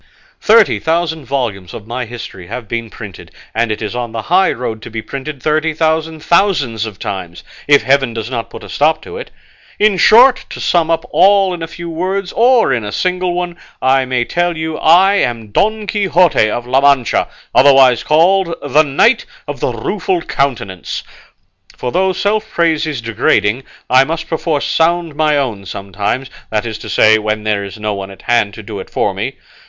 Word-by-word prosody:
Thirty 220 -1 +4
thousand 160 -2 -1
volumes 115 -10 -3
of 105 - -9
my 120 +2 -4
history 110 -6 -9
have 120 +4 -7
been 115 +1 -4
printed, 105 -4 -10 0.2
and 115 -1 0
it 110 - -4
is 110 - -4
on 120 -2 -4
the 115 -1 -4
high 185 - +3
road 115 -3 -5
to - - -9
be 115 0 -5
printed 135 +4 -7
thirty 155 +1 0
thousand 160 0 -1
thousands 150 - +1
of 105 -3 -9
times, 90 -4 -6 0.2
if 145 -1 +5
heaven 135 -2 +2
does 115 -1 -5
not 115 -2 -4
put - - -10
a - - -11
stop 155 +2 +1
to 440 - -8
it. - - -8 0.5
In 210 -2 +3
short, 250 +7 +6
to - - -8
sum 170 -2 +1
up 165 0 0
all 195 -1 +4
in 175 - -6
a 165 - -4
few 170 +1 -8
words, 185 +3 -3
or 235 - +3
in 120 -3 -1
a 105 - -5
single 180 - -1
one, 175 -1 -3 0.2
I 130 0 +2
may 125 -1 -1
tell 175 +2 -1
you 160 0 -3
I 190 +5 +5
am 115 - -1
Don 215 - 0
Quixote 185 - +2
of 120 +2 -3
La 130 +2 +2
Mancha, 140 -4 +2 0.3
otherwise 130 -3 +5
called 170 +3 +2
'The 145 +2 +3
Knight 155 - +2 0.2
of - - -5
the - - -1
Rueful 365 -3 -2
Countenance;' 115 -10 -3 0.7
for 125 - -3
though 190 +4 +1
self 215 +3 -1
praise 165 -2 +1
is 145 -6 -4
degrading, 115 +1 0 0.2
I 130 +1 +5
must 160 +2 -4
perforce 160 -3 -1
sound 170 0 +1
my 150 0 +1
own 110 -9 -3
sometimes, 100 +8 -4 0.2
that 110 +1 -1
is 110 -2 -5
to - - -9
say, 110 +1 +4
when 110 0 -2
there 105 -2 -1
is 100 0 -8
no 105 0 -2
one 100 -1 -6
at 95 - -14
hand 115 -4 +1
to 110 - -10
do 105 -1 -7
it - - -9
for - - -1
me. - - -4
140 Hz, 195 wpm, -15 LUFS, 115-170 Hz, 0.7 s, short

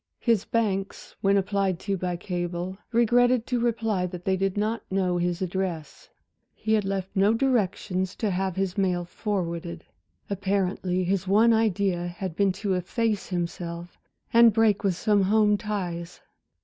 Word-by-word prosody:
His 230 -5 +1
banks 200 -4 -2
when 200 0 +3
applied 195 -1 0
to 200 -1 -1
by 180 -1 -2
cable, 175 0 -4 0.2
regretted 240 +1 +3
to 250 -1 -1
reply 225 -5 0
that 180 0 -9
they 190 - +2
did 195 +1 -1
not 215 +2 0
know 185 -2 +1
his 175 +1 -1
address. 180 -4 -4 0.5
He 220 - -1
had 210 -2 +2
left 195 -1 -2
no 200 +3 +4
directions 195 -7 0
to 215 -3 -1
have 190 0 -1
his 190 0 -1
mail 180 -2 +1
forwarded. 170 -4 -4 0.4
Apparently 190 -2 -1
his 190 +1 -1
one 220 +4 +5
idea 200 -5 +1
had 175 -1 -5
been 200 0 +3
to 195 +1 -2
efface 210 +4 -1
himself 175 -1 -5 0.3
and 230 -1 +7
break 220 -2 +3
with 195 -3 +1
some 205 +2 +2
home 210 +2 +3
ties. 180 -5 -4
195 Hz, 150 wpm, -26 LUFS, 180-210 Hz, 0.5 s, and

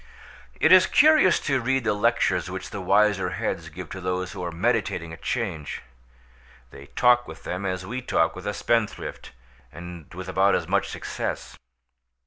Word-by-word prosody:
It - - +4
is - - +8
curious 305 - +5
to 135 -3 0
read 130 +2 0
the 110 -2 +1
lectures 105 -5 +1
which 95 0 -6
the 100 - -5
wiser 100 0 +2
heads 80 0 -3
give 85 +3 -8
to 95 - -6
those 90 0 -2
who - - -6
are 85 - -3
meditating 85 0 -1
a - - -8
change. 90 - -4 0.9
They 70 - -12
talk 120 0 +3
with - - -11
them 90 +2 -3
as 90 -1 -3
we 125 +6 -4
talk 80 -9 +1
with 90 +2 -8
a 105 - -1
spendthrift, 115 -1 -2 0.4
and 85 -2 -10
with 95 0 -7
about 95 +1 +3
as - - -2
much - - +1
success. - - -5
95 Hz, 170 wpm, -25 LUFS, 90-115 Hz, 0.9 s, is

